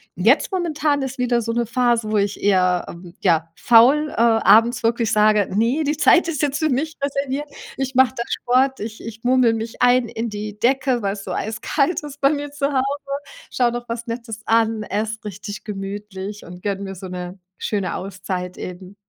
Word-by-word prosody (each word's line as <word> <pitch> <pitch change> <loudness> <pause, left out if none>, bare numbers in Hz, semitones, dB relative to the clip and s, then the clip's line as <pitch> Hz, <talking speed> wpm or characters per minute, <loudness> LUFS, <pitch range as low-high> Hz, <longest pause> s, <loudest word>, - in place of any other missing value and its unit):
Jetzt - - +3
momentan 310 -5 0
ist 265 +1 -5
wieder 245 -1 +1
so 230 0 -2
'ne 235 0 0
Phase, 235 -1 +1
wo 215 - +2
ich 200 0 -1
eher, 185 -3 +3
ähm 170 0 -11
ja 165 -3 +2
faul, 260 +6 +5
äh, - - -10
abends 230 +1 +4
wirklich 230 -1 +1
sage: 210 -1 +4
„Ne, 235 +9 +2
die 295 0 -1
Zeit 335 +2 +5
ist 310 -4 -2
jetzt 290 0 0
für 315 - +1
mich 305 +4 -1
reserviert.“ 280 +1 -2 0.3
Ich 270 -1 -3
mache 260 -2 +5
da 235 - -2
Sport, 260 +2 +1
ich 215 +1 -6
ich 225 0 -9
murmel 250 -2 +4
mich 225 +1 -5
ein 250 -1 +4
in 225 +1 -3
die 210 0 -6
Decke, 260 +1 +2
weil's 200 0 -3
so - - -6
eiskalt 280 +9 -1
ist 290 -1 -9
bei 275 - +5
mir 290 -1 -3
zu 285 -1 -1
Hause, 260 -1 +2 0.7
schaue 245 -2 +1
noch 240 0 -5
was 230 +1 -4
Nettes 230 -2 -6
an, 225 -1 +2
esse 215 +2 -3
richtig 205 +1 -7
gemütlich 205 0 -6
und 180 +1 -11
gönne 200 -1 -2
mir 195 -1 -5
so 190 0 -8
'ne 180 +1 -6 0.2
schöne 200 -3 -2
Auszeit 185 -1 -5
eben. 185 +2 -8
230 Hz, 190 wpm, -21 LUFS, 205-265 Hz, 0.7 s, faul